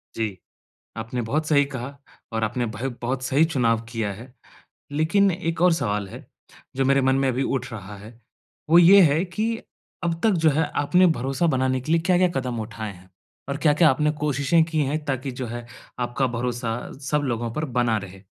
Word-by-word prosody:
जी। 110 -4 -2 0.6
आपने 115 +2 -3
बहुत 150 +7 -1
सही 145 -2 +4
कहा 130 +3 -6 0.4
और 110 0 -1
आपने 120 +3 -1
भयो 130 +6 -3
बहुत 130 +2 -2
सही 140 +5 +3
चुनाव 115 -7 +1
किया 110 -3 -2
है। 120 +6 -12 0.6
लेकिन 175 +7 +3
एक 165 -1 -3
और 180 -2 +5
सवाल 105 -9 -1
है, - - -10 0.5
जो 135 0 +1
मेरे 135 +1 +3
मन 130 0 +3
में 135 0 +1
अभी 130 +2 0
उठ 130 -1 -2
रहा 105 -1 -8
है। 110 +4 -13 0.5
वो 170 +2 +8
ये 190 +4 +8
है 160 +1 +4
कि 220 +5 -2 0.5
अब 165 -1 -1
तक 220 - +4
जो - - +7
है 155 +2 +1 0.2
आपने 180 +5 +4
भरोसा 135 +6 0
बनाने 130 -3 +1
के 155 - -4
लिए 165 0 +3
क्या-क्या 180 +1 +3
कदम 125 -3 -4
उठाए 110 -1 -6
हैं? 90 +1 -18 0.4
और 140 - -2
क्या-क्या 150 +1 +4
आपने 150 +3 +2
कोशिशें 145 +3 +2
की 160 -2 -1
है 145 +3 -1
ताकि 135 -1 -2
जो 125 0 -5
है 120 +1 -6 0.3
आपका 120 +2 0
भरोसा 120 -1 -2 0.3
सब 150 0 +2
लोगों 120 -2 -2
पर 155 +4 -2
बना 115 -2 +2
रहे? 95 -1 -9
130 Hz, 195 wpm, -24 LUFS, 120-155 Hz, 0.6 s, वो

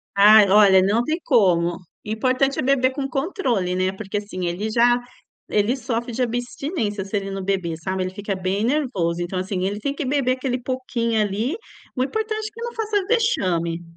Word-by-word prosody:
Ai, 205 0 +7
olha, 195 -2 +6
não 210 +5 +2
tem 315 +6 -1
como. 175 - +3 0.3
Importante 255 +5 0
é - - +2
beber 260 -1 +2
com 275 -1 -3
controle, 260 - -1
né? 185 0 +1
Porque 195 +1 -5
assim, 185 -3 -4
ele 185 +6 -2
já, 240 +2 +4 0.5
ele 210 +4 +2
sofre 240 -2 -3
de 245 +2 -3
abstinência 240 - -2
se 200 +2 -5
ele 195 -1 -2
não 195 -1 -4
beber, 185 -4 -1
sabe, 185 +3 -3
ele 185 - -2
fica 200 0 -4
bem 190 +2 -1
nervoso, 225 - 0
então 175 +2 -3
assim, 185 0 -3
ele 205 +2 -2
tem 280 +5 -2
que 290 - -4
beber 260 -1 +1
aquele 255 -1 -2
pouquinho 240 -3 -1
ali, 210 - -1 0.4
o 255 - +1
importante 435 +7 -2
é 425 - -10
que 460 - -11
não 475 0 -4
faça 425 -3 -1
vexame. 180 - 0
220 Hz, 190 wpm, -22 LUFS, 190-265 Hz, 0.5 s, Ai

